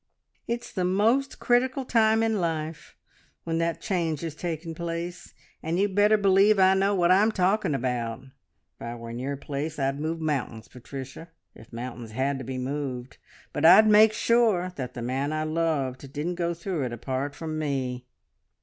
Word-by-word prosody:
It's 235 +1 -4
the 185 - -1
most 225 +9 +2
critical 255 +2 +1
time 225 -2 +3
in 220 -3 +1
life, 160 -2 -4 0.5
when 165 0 -1
that 165 0 -1
change 170 -5 -2
is 165 -2 -4
taking 165 0 -5
place, 170 +1 -5 0.3
and 165 +2 -2
you'd 200 0 +1
better 210 +2 +4
believe 200 +1 +4
I 190 0 +6
know 195 +1 +2
what 175 -1 +3
I'm 205 +4 +5
talking 190 -5 +1
about. 120 -2 -2
If 135 0 -26
I 120 0 -5
were 115 0 -8
in 120 - -6
your 140 +2 -3
place 145 +3 -4
I'd 135 0 -1
move 160 +2 -2
mountains, 135 -8 -3
Patricia, 135 +5 -9 0.2
if 110 - -16
mountains 120 -1 -7
had 135 +3 -1
to - - -6
be 130 +1 -5
moved, 130 -1 -4 0.3
but 145 - -3
I'd 195 +7 +8
make 215 +1 +7
sure 215 -5 +2
that 125 -4 -6
the 120 - -5
man 135 +4 -1
I 155 0 -1
loved 150 -5 -2
didn't 150 +5 -3
go 170 -1 -2
through 170 -4 -3
it 120 - -4
apart 135 +4 -3
from 155 -1 -4
me!" 130 -4 -3
160 Hz, 175 wpm, -26 LUFS, 135-190 Hz, 0.5 s, I'd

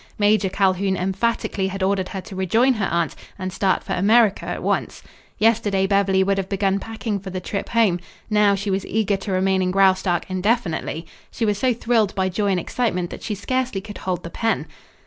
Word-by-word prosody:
Major 205 -1 +3
Calhoun 190 0 +1
emphatically 195 +1 -1
had 190 0 -4
ordered 190 -1 0
her 190 - -5
to 190 - -10
rejoin 220 +8 +3
her 215 -5 -1
aunt 170 -2 0 0.2
and 185 -2 -4
start 190 -1 +1
for - - -3
America 210 +2 +3
at - - -4
once. - - -1 0.3
Yesterday 210 -3 +2
Beverly 195 -1 +3
would 195 0 +1
have 190 - -4
begun 195 0 +1
packing 220 -1 -4
for 190 0 -8
the 185 0 -4
trip 195 +2 -4
home. 220 -7 +3 0.3
Now 210 -2 +4
she 200 +1 -3
was 190 0 0
eager 210 -2 +1
to 195 +1 -6
remain 190 0 +2
in 185 - +1
Graustark 190 -2 +3
indefinitely. 185 -4 -1 0.2
She 230 - -2
was 205 -2 0
so 255 +2 +2
thrilled 225 -3 +1
by 190 -1 +1
joy 205 +3 -1
and 190 -2 +2
excitement 180 -4 -2
that - - -8
she 210 - -3
scarcely 255 +1 -1
could 205 +1 -9
hold 180 -2 -3
the 170 - -7
pen. 225 +4 -1
195 Hz, 200 wpm, -22 LUFS, 190-215 Hz, 0.3 s, Now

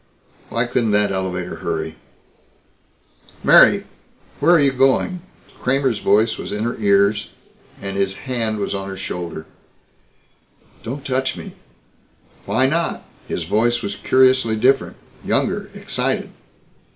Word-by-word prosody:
Why 115 +3 0
couldn't 120 -1 0
that 105 -1 +3
elevator 90 -2 -3
hurry? - - -3 1.5
"Mary! - - +6 0.6
Where 175 - +5
are - - +5
you 140 -1 +4
going?" 135 +7 +1 0.4
Kramer's 130 -3 +1
voice 110 +3 +2
was - - -6
in 105 +1 -2
her 120 +1 -2
ears, 100 0 +2 0.5
and 100 0 -5
his 95 -1 0
hand 115 -4 -1
was 100 - -2
on 95 0 -4
her 95 - -7
shoulder. 85 -4 -5 1.4
"Don't 135 +4 -6
touch 130 0 -1
me!" - - -8 1.0
"Why 130 - +2
not?" 165 +5 -1 0.2
His 85 - -3
voice 115 +7 +1
was 100 - -3
curiously 130 0 +3
different. 130 +5 +2 0.3
Younger, - - 0
excited. - - -2
110 Hz, 125 wpm, -20 LUFS, 100-130 Hz, 1.5 s, Mary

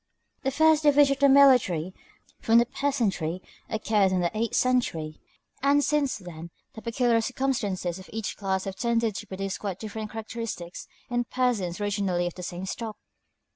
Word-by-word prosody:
The 270 - 0
first 315 +2 +4
division 290 -2 +5
of - - -23
the 280 0 +5
military 245 - +5 0.5
from 225 +1 +4
the 235 - +5
peasantry 225 - -1 0.3
occurred 215 -3 +2
in 185 -1 +1
the 175 +4 -1
eighth 225 +1 -1
century, 165 -12 0 0.4
and 285 +1 +4
since 290 -2 +1
then 170 -3 -9 0.2
the 220 - -9
peculiar 235 0 +1
circumstances 220 -8 -2
of 190 - -13
each 220 -1 -4
class 190 -2 -1
have 195 -1 -6
tended 230 -2 +1
to 210 - -7
produce 195 0 -4
quite 195 -4 -4
different 215 0 -6
characteristics 220 -5 -6 0.2
in 240 0 0
persons 220 -10 -1
originally 200 -4 0
of 175 - -3
the 180 - -9
same 180 +1 -5
stock. 220 +2 -5
220 Hz, 165 wpm, -26 LUFS, 185-255 Hz, 0.5 s, division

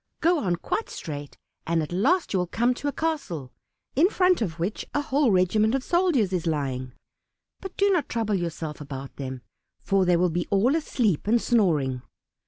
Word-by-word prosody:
Go 340 0 +3
on 180 -9 0
quite 430 - -3
straight, 145 -2 -7 0.3
and 165 -1 +1
at 150 - -7
last 275 - +1
you 190 - +2
will 180 - -1
come 240 +7 +1
to 290 - -5
a - - +1
castle, 275 - -3 0.4
in 325 +8 +5
front 365 - +3
of 170 -7 -2
which 180 +5 -2
a 290 - +2
whole 285 -2 +2
regiment 210 +5 +3
of 270 - -1
soldiers 330 - +2
is 175 -2 -1
lying, 130 -5 -2 0.7
but 385 -1 -9
do 400 0 +3
not 350 -6 +1
trouble 225 -3 -1
yourself 165 -4 -3
about 135 -2 -7
them, 130 -2 -6 0.4
for 195 -1 +2
they 175 -1 +4
will 175 -1 +1 0.2
all 200 +6 +3
be - - +2
asleep 220 - 0
and 235 +2 +4
snoring. 155 - +1
195 Hz, 190 wpm, -25 LUFS, -, 0.7 s, in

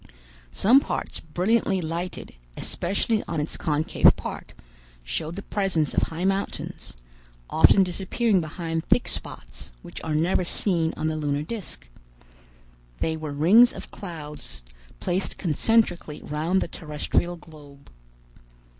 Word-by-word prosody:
Some 240 - +6
parts - - -4
brilliantly 190 +5 +1
lighted, 170 +2 -4 0.2
especially 200 +4 -1
on 165 - -2
its 150 - -3
concave 155 -1 +3
part, - - -7 0.5
showed 65 - -3
the 200 - -6
presence 185 -8 0
of - - +2
high 165 +3 -2
mountains, 195 - -2 0.6
often 190 +4 +6
disappearing 190 +3 +1
behind 165 0 -3
thick - - +3
spots, - - -6
which - - -9
are 155 -1 -1
never 170 +4 +2
seen 170 -2 0
on - - -2
the 155 0 0
lunar 145 -1 -1
disc. 195 - -7 1.1
They 160 - 0
were 155 -2 -5
rings 190 +12 +6
of - - -9
clouds 150 - -8 0.4
placed 185 +1 -1
concentrically 175 -2 +1
round 160 +6 0
the - - -1
terrestrial 165 +2 -2
globe. 145 -4 -15
165 Hz, 125 wpm, -25 LUFS, 150-190 Hz, 1.1 s, Some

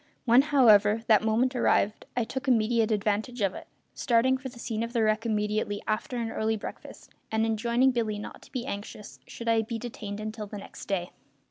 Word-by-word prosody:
When, 240 +1 +6
however, 225 -7 +5
that 215 -2 +5
moment 235 +4 +1
arrived 215 -3 +1
I 240 - +3
took 260 +5 -5
immediate 230 -2 +3
advantage 215 +3 -1
of 195 -2 +1
it, - - -10 0.3
starting 250 +1 +2
for 260 0 -6
the 245 - -15
scene 225 -2 -3
of 230 +1 -4
the 230 -2 +2
wreck 215 +2 +1
immediately 210 -1 -1
after 215 +3 -2
an 230 -1 -2
early 220 0 0
breakfast, - - -10 0.2
and 220 0 +1
enjoining 235 +4 +2
Billy 225 -4 -1
not 205 - -8
to - - -18
be 250 -1 -4
anxious 205 -2 -7
should 235 - -8
I 225 -1 +4
be 225 +1 -4
detained 215 -3 -6
until 215 0 -5
the 210 - -7
next 200 - -10
day. 180 -3 -2
225 Hz, 200 wpm, -28 LUFS, 210-240 Hz, 0.3 s, When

